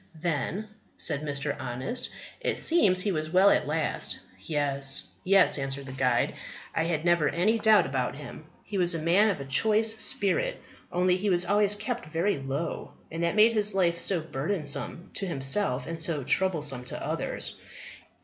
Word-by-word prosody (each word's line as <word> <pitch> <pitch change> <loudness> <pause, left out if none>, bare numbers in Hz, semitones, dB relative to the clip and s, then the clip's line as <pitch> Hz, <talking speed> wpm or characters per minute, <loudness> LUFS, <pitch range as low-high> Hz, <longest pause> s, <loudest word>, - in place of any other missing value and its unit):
"Then," 175 +6 -2 0.3
said 150 -3 +2
Mr. 145 -1 -2
Honest, 130 - -3 0.3
"it - - -1
seems 200 - +4
he 205 - 0
was 155 -3 -2
well 185 +4 +5
at - - +1
last." 155 0 -1 0.2
"Yes, 140 +1 -1 0.2
yes," 190 -5 +4
answered 135 0 -3
the 135 - -7
guide, 130 -2 +1 0.4
"I 165 -1 0
never 170 -3 +3
had - - -3
any 220 +5 +3
doubt 220 -1 +5
about - - -2
him; - - -10 0.2
he 200 - -4
was 175 -1 +3
a - - -2
man 180 +7 +3
of 195 - -2
a 140 - -6
choice 220 +10 +2
spirit, 220 - -1 0.3
only 180 +1 +2
he 200 +2 -1
was 175 -1 +2
always 205 +2 +3
kept 235 +2 -4
very 165 +2 0
low, 135 +4 -4 0.2
and 165 +1 -3
that 170 +3 0
made 220 +2 +6
his 210 -2 +1
life 170 -3 +2
so 180 -2 +1
burdensome 155 +2 -4
to 195 - -3
himself 135 -3 0
and 165 0 -4
so 155 -3 +1
troublesome 150 -6 0
to - - -5
others. - - -3
170 Hz, 170 wpm, -27 LUFS, 145-200 Hz, 0.4 s, made